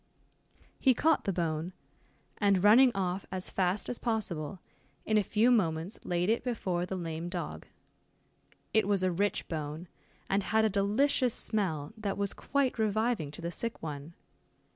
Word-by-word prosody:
He 260 Hz, -2 st, +4 dB
caught 320 Hz, +4 st, +2 dB
the 195 Hz, -, +1 dB
bone, 170 Hz, 0 st, -2 dB, 0.7 s
and 200 Hz, -3 st, +3 dB
running 240 Hz, +5 st, +7 dB
off 190 Hz, 0 st, -2 dB
as 185 Hz, -1 st, -3 dB
fast 190 Hz, +1 st, 0 dB
as 245 Hz, -, -3 dB
possible, 190 Hz, -, -2 dB, 0.5 s
in 215 Hz, -, +1 dB
a -, -, +3 dB
few 220 Hz, +5 st, +3 dB
moments 170 Hz, -3 st, +1 dB
laid 175 Hz, 0 st, 0 dB
it 225 Hz, +2 st, +1 dB
before 185 Hz, -8 st, -1 dB
the 190 Hz, -, -3 dB
lame 165 Hz, -1 st, -4 dB
dog. -, -, -5 dB, 1.1 s
It 220 Hz, -3 st, +3 dB
was 200 Hz, -2 st, +2 dB
a 185 Hz, -, +2 dB
rich 200 Hz, +4 st, 0 dB
bone, 155 Hz, +1 st, -5 dB, 0.4 s
and 195 Hz, +1 st, +2 dB
had 220 Hz, +3 st, +2 dB
a -, -, +3 dB
delicious 220 Hz, +6 st, +2 dB
smell 160 Hz, -9 st, -1 dB
that 210 Hz, -3 st, -3 dB
was 200 Hz, -1 st, -1 dB
quite 270 Hz, -4 st, 0 dB
reviving 220 Hz, -5 st, +1 dB
to 150 Hz, +4 st, -9 dB
the 170 Hz, -, -2 dB
sick 230 Hz, +3 st, -4 dB
one. 150 Hz, +1 st, -6 dB
195 Hz, 160 wpm, -30 LUFS, 175-220 Hz, 1.1 s, running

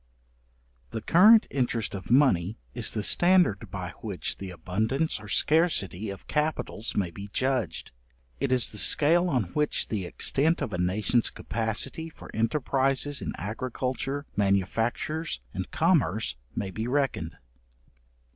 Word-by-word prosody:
The 110 Hz, -1 st, -5 dB
current 215 Hz, +6 st, +7 dB
interest 120 Hz, -4 st, -1 dB
of 95 Hz, -3 st, -7 dB
money 115 Hz, -7 st, +3 dB, 0.2 s
is 120 Hz, -2 st, 0 dB
the 105 Hz, -, -1 dB
standard 175 Hz, -, +3 dB
by -, -, -5 dB
which -, -, -3 dB
the 95 Hz, -, -6 dB
abundance 110 Hz, -, -1 dB
or 105 Hz, -, -11 dB
scarcity 110 Hz, -, +1 dB
of 100 Hz, -, -8 dB
capitals 150 Hz, -7 st, -2 dB
may 95 Hz, -4 st, 0 dB
be 100 Hz, +4 st, -8 dB
judged; 130 Hz, -11 st, -1 dB, 0.5 s
it -, -, -1 dB
is 125 Hz, -2 st, +3 dB
the 105 Hz, -, -5 dB
scale 165 Hz, -, +4 dB
on 125 Hz, -7 st, +1 dB
which 150 Hz, -1 st, 0 dB
the 100 Hz, -5 st, -2 dB
extent 150 Hz, -, +1 dB
of 130 Hz, -8 st, -3 dB
a 90 Hz, -, -2 dB
nation's 105 Hz, +6 st, +2 dB
capacity 115 Hz, +8 st, -3 dB
for -, -, -13 dB
enterprizes 135 Hz, +4 st, 0 dB
in -, -, -4 dB
agriculture, 130 Hz, +5 st, -3 dB
manufactures, 115 Hz, -, 0 dB
and 95 Hz, -1 st, -4 dB
commerce, 145 Hz, -, +1 dB, 0.2 s
may 95 Hz, -2 st, -3 dB
be 110 Hz, +4 st, -4 dB
reckoned. 130 Hz, -, -1 dB
120 Hz, 135 wpm, -27 LUFS, 100-145 Hz, 0.5 s, current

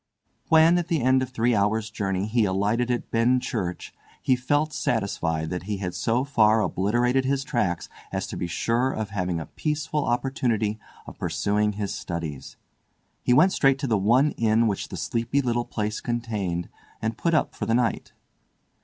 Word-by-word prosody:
When 160 Hz, +2 st, +6 dB
at 175 Hz, -, -3 dB
the 165 Hz, -7 st, 0 dB
end 130 Hz, +1 st, +4 dB
of 130 Hz, -, -2 dB
three 120 Hz, -1 st, +1 dB
hours' 110 Hz, +1 st, +1 dB
journey 95 Hz, -3 st, -1 dB
he 115 Hz, +2 st, +1 dB
alighted 105 Hz, +6 st, 0 dB
at 120 Hz, -1 st, -2 dB
Benchurch, 115 Hz, -6 st, 0 dB, 0.3 s
he 130 Hz, -, +2 dB
felt 145 Hz, +5 st, 0 dB
satisfied 80 Hz, -8 st, -1 dB
that 90 Hz, 0 st, -4 dB
he 105 Hz, -, -1 dB
had 90 Hz, -2 st, -4 dB
so 120 Hz, +3 st, 0 dB
far 110 Hz, -6 st, +4 dB
obliterated 120 Hz, +7 st, +1 dB
his 135 Hz, +1 st, 0 dB
tracks 120 Hz, -, -1 dB, 0.2 s
as -, -, -2 dB
to -, -, -7 dB
be 90 Hz, -, -3 dB
sure 115 Hz, +9 st, 0 dB
of 110 Hz, -4 st, -4 dB
having 90 Hz, -4 st, -1 dB
a 80 Hz, -, -5 dB
peaceful 150 Hz, -1 st, -2 dB
opportunity 120 Hz, -4 st, 0 dB, 0.3 s
of -, -, -11 dB
pursuing 100 Hz, +5 st, 0 dB
his 100 Hz, -1 st, -3 dB
studies. 80 Hz, -6 st, -6 dB, 0.6 s
He -, -, 0 dB
went 155 Hz, +10 st, +6 dB
straight 135 Hz, -1 st, +3 dB
to 140 Hz, 0 st, -3 dB
the 115 Hz, -, +2 dB
one 120 Hz, +9 st, +3 dB
inn 115 Hz, 0 st, +3 dB
which 100 Hz, -3 st, -1 dB
the -, -, -7 dB
sleepy 115 Hz, +4 st, -1 dB
little 120 Hz, -3 st, 0 dB
place 105 Hz, -1 st, -3 dB
contained, 105 Hz, -8 st, -2 dB, 0.3 s
and 110 Hz, +1 st, -2 dB
put 170 Hz, +5 st, 0 dB
up 155 Hz, -, +1 dB
for -, -, -4 dB
the 115 Hz, -, +2 dB
night. 120 Hz, -3 st, 0 dB
115 Hz, 175 wpm, -25 LUFS, 100-130 Hz, 0.6 s, When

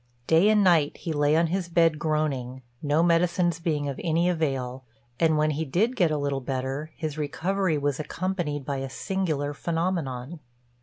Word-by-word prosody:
Day 165 Hz, +8 st, +5 dB
and 215 Hz, -1 st, +4 dB
night 165 Hz, -6 st, +3 dB
he 165 Hz, -, -4 dB
lay 145 Hz, 0 st, +2 dB
on 165 Hz, +1 st, +4 dB
his 175 Hz, +1 st, -2 dB
bed 165 Hz, -2 st, +3 dB
groaning, 140 Hz, -5 st, -1 dB, 0.2 s
no 150 Hz, +2 st, +2 dB
medicines 170 Hz, 0 st, +2 dB
being 150 Hz, -4 st, -1 dB
of 140 Hz, -, -4 dB
any 170 Hz, +1 st, +2 dB
avail; 135 Hz, -7 st, -1 dB, 0.4 s
and 160 Hz, -2 st, +3 dB
when 155 Hz, 0 st, +2 dB
he 155 Hz, +2 st, -2 dB
did 200 Hz, -, 0 dB
get 180 Hz, -8 st, +3 dB
a 155 Hz, -, 0 dB
little 140 Hz, -1 st, -1 dB
better, 135 Hz, +4 st, -3 dB
his 155 Hz, -2 st, -4 dB
recovery 175 Hz, +3 st, 0 dB
was 145 Hz, -1 st, -1 dB
accompanied 160 Hz, -4 st, -3 dB
by 140 Hz, 0 st, -2 dB
a 135 Hz, 0 st, -4 dB
singular 155 Hz, -3 st, -2 dB
phenomenon. 165 Hz, -3 st, -2 dB
155 Hz, 170 wpm, -26 LUFS, 145-170 Hz, 0.4 s, Day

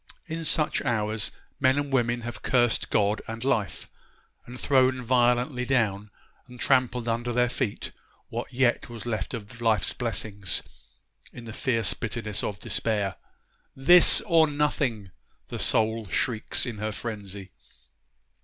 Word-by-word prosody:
In 165 Hz, 0 st, -5 dB
such 155 Hz, 0 st, +1 dB
hours 110 Hz, -1 st, -1 dB, 0.3 s
men 130 Hz, +2 st, +3 dB
and 145 Hz, -1 st, -2 dB
women 120 Hz, -2 st, +1 dB
have 120 Hz, -2 st, -7 dB
cursed 120 Hz, -3 st, +1 dB
God 105 Hz, 0 st, +1 dB
and 115 Hz, +1 st, -5 dB
life, 115 Hz, -7 st, -1 dB, 0.6 s
and 125 Hz, +1 st, -9 dB
thrown 130 Hz, -2 st, +2 dB
violently 125 Hz, +2 st, +2 dB
down 110 Hz, -6 st, 0 dB, 0.4 s
and 125 Hz, -1 st, -13 dB
trampled 125 Hz, -3 st, +2 dB
under 115 Hz, +1 st, -1 dB
their 125 Hz, 0 st, +2 dB
feet 125 Hz, -5 st, -3 dB, 0.4 s
what -, -, -5 dB
yet 125 Hz, -1 st, +1 dB
was 115 Hz, -2 st, -8 dB
left 110 Hz, -2 st, -3 dB
of 115 Hz, +2 st, -9 dB
life's 110 Hz, -5 st, +2 dB
blessings 105 Hz, -5 st, -2 dB, 0.7 s
in 120 Hz, -, -10 dB
the 110 Hz, -1 st, -8 dB
fierce 115 Hz, -3 st, +1 dB
bitterness 110 Hz, -2 st, -3 dB
of 100 Hz, -, -3 dB
despair. 105 Hz, -4 st, -1 dB, 0.6 s
This 170 Hz, +7 st, +7 dB
or 165 Hz, -5 st, +4 dB
nothing! 140 Hz, -9 st, -1 dB, 0.4 s
the -, -, -5 dB
soul 110 Hz, -1 st, +1 dB
shrieks 110 Hz, +9 st, 0 dB
in 120 Hz, -4 st, -5 dB
her 110 Hz, +1 st, -2 dB
frenzy. 100 Hz, -4 st, -6 dB
120 Hz, 135 wpm, -26 LUFS, 110-130 Hz, 0.7 s, This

